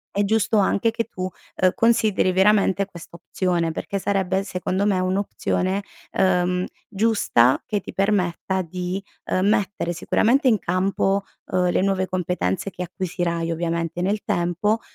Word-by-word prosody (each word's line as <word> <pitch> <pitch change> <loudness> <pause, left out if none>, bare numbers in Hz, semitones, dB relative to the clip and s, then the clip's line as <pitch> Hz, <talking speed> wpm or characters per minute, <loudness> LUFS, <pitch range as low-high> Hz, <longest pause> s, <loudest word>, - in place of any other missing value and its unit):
è 205 - +2
giusto 220 +1 +2
anche 200 +3 +2
che 230 0 -2
tu, 185 -4 -5 0.3
ehm, 185 -1 +3
consideri 220 -5 +3
veramente 195 0 +3
questa 170 -3 -12
opzione, 170 -1 -1
perché 200 +4 -4
sarebbe 190 -1 0
secondo 190 +1 -2
me 195 -3 +2
un'opzione, 190 0 -1 0.3
ehm, 180 -1 +1 0.2
giusta, 200 - +3
che 210 - -1
ti - - -9
permetta 190 -1 0
di, 180 +2 -4 0.2
ehm, 185 +2 +1
mettere 205 -4 0
sicuramente 235 - +2
in 220 -5 +4
campo, 195 +3 0 0.3
uhm, 180 -1 +2
le - - +1
nuove 190 -1 +1
competenze 185 +1 -1
che 180 0 -6
acquisirai, 170 -2 -2
ovviamente 170 0 -2
nel 205 +3 0
tempo, 180 +6 0
190 Hz, 140 wpm, -23 LUFS, 180-200 Hz, 0.3 s, in